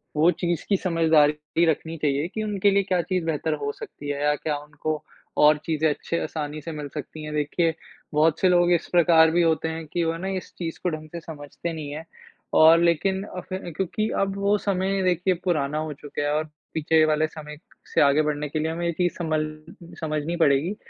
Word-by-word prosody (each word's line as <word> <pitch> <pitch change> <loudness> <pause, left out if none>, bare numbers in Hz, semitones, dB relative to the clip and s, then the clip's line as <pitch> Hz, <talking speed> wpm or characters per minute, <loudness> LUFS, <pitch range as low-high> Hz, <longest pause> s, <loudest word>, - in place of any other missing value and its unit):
वो 155 +3 +5
चीज़ 175 -2 -2
की 200 - +4
समझदारी 160 -2 +2
रखनी 160 +1 -1
चाहिए 145 +1 0
कि 215 +4 -4
उनके 205 -1 +2
लिए 200 0 +3
क्या 185 -2 +1
चीज़ 180 +1 -2
बेहतर 160 0 -1
हो 145 - -1
सकती 145 0 -9
है, 145 0 -2
या 150 0 +3
क्या 150 0 -2
उनको 150 +1 -4 0.4
और 150 0 +7
चीज़ें 160 -1 +1
अच्छे 160 +3 -2
आसानी 150 -1 -4
से 165 - -6
मिल 150 -2 -5
सकती 155 +1 -7
हैं। 150 0 -6
देखिए, 160 +3 +1 0.4
बहुत 155 +1 +3
से 185 - +4
लोग 175 0 +4
इस 170 - 0
प्रकार 165 -2 +5
भी 175 +1 +3
होते 160 -1 +2
हैं 160 0 -5
कि 175 - +1
वो 165 0 -1
ना 185 +3 -5
इस - - -9
चीज़ 165 -2 -5
को 180 - +2
ढंग 155 -1 -6
से 170 - -5
समझते 160 +1 -7
नहीं 150 -3 -6
हैं 155 +2 -7 0.6
और 160 +1 +8
लेकिन 190 +3 +2
अब 180 -3 -7
फिर 185 -2 -5
क्योंकि 215 +3 -1
अब 195 0 0
वो 200 +1 +2
समय 195 -1 0
देखिए 180 +1 +2
पुराना 150 -5 0
हो 155 -1 -3
चुका 145 +1 -6
है, 145 - 0
और 155 +1 0 0.3
पीछे 160 0 +3
वाले 155 0 +2
समय 150 -1 -9 0.4
से - - +4
आगे 145 +1 +5
बढ़ने 150 -1 -2
के 155 - -2
लिए 160 +1 -1
हमें 170 +1 -3
ये 170 - +1
चीज़ 175 +1 0
सँभल 155 -3 0 0.5
समझनी 155 +1 -2
पड़ेगी। 150 +7 +2
160 Hz, 215 wpm, -25 LUFS, 150-175 Hz, 0.6 s, और